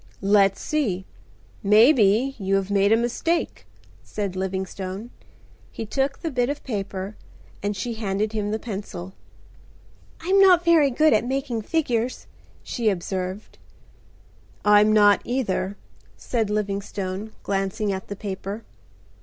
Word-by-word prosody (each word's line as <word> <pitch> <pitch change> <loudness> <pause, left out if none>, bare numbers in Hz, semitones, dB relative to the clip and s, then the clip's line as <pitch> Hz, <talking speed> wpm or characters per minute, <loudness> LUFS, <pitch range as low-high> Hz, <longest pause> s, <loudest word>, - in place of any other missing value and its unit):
"Let's 195 -1 +3
see. 215 - -1 0.6
Maybe, 225 +3 +5
you 195 0 0
have 195 0 -1
made 200 0 +3
a 225 - +6
mistake," 245 +9 -1 0.3
said 200 -3 -4
Livingstone. 190 +3 -4 0.6
He 225 - -5
took 270 +5 -1
the 325 - -2
bit 250 -1 +1
of 290 - -4
paper 200 -3 -4 0.5
and 205 0 -2
she 240 +2 -3
handed 215 0 -2
him 210 -1 -1
the 215 - -1
pencil. 195 -5 -6 1.1
"I'm 375 +4 +2
not 360 -3 +6
very 325 -4 +5
good 305 +4 +3
at 215 - +3
making 260 -2 -2
figures," 250 -3 -1 0.4
she 230 -3 0
observed. 190 +1 -4 1.1
"I'm 210 +1 +6
not 205 -1 +5
either," 205 -6 -2 0.4
said 225 -4 -1
Livingstone, 200 0 -3
glancing 195 +1 -1
at 190 0 -6
the 205 - -5
paper. 200 +2 -5
210 Hz, 125 wpm, -24 LUFS, 195-245 Hz, 1.1 s, a